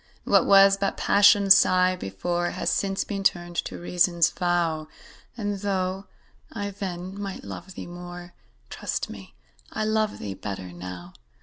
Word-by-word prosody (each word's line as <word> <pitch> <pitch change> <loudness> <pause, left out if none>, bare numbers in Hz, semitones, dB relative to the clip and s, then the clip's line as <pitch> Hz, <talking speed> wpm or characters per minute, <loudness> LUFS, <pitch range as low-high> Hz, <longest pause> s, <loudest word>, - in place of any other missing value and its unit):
What - - +3
was 195 0 +7
but 200 0 -1
Passion's 200 -1 +6
sigh 185 -1 +4
before, 175 - -2
Has - - -2
since 195 -1 0
been 200 -2 -4
turned 175 -2 0
to - - -3
Reason's 175 -1 +2
vow; 170 -3 0 0.5
And, 205 -3 -3
though 190 -1 -2 0.4
I 205 -2 -4
then 190 0 -6
might 195 -2 -6
love 100 - -9
thee - - -7
more, 175 0 -9 0.4
Trust - - -3
me, - - -12 0.4
I 215 - -2
love 215 0 0
thee 100 - -5
better 95 -2 -6
now. 90 0 -9
180 Hz, 145 wpm, -25 LUFS, 175-195 Hz, 0.5 s, was